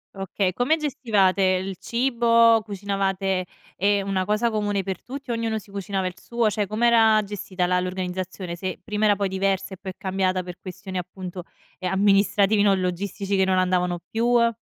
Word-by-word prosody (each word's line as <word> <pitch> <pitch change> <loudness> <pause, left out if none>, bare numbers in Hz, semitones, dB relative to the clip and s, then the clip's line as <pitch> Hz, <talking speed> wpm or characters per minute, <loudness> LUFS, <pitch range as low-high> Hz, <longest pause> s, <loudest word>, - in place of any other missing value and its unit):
Okay, 195 -1 -1
come 260 - +2
gestivate 215 -10 +1
il 185 +1 +1
cibo? 230 -2 +3
Cucinavate, 195 -2 -1 0.3
ehm, 200 0 +1
una 190 -1 0
cosa 215 +3 +1
comune 205 -2 -1
per 190 0 -5
tutti? 275 0 -7
Ognuno 230 -1 -1
si 205 - -18
cucinava 195 -1 -3
il 180 - -6
suo? 235 -2 0
Cioè 210 -1 -1
com'era 220 0 +4
gestita 195 -3 -3
la 180 0 +2
l'organizzazione? 185 0 -4
Se 185 +1 -5
prima 210 -1 -1
era 205 -1 +5
poi 200 - 0
diversa 190 0 -1
e - - -8
poi 190 +1 -6
è - - -16
cambiata 190 -1 0
per 180 -1 -8
questioni 185 0 -7
appunto, 180 0 -6 0.4
ehm, 180 -1 -2
amministrativi 200 +1 +3
non 195 -2 +3
logistici 190 +2 -2
che 190 0 +3
non 190 0 +2
andavano 180 -1 +1
più, 225 +1 -1
uhm 235 -2 +3
195 Hz, 175 wpm, -24 LUFS, 185-215 Hz, 0.4 s, era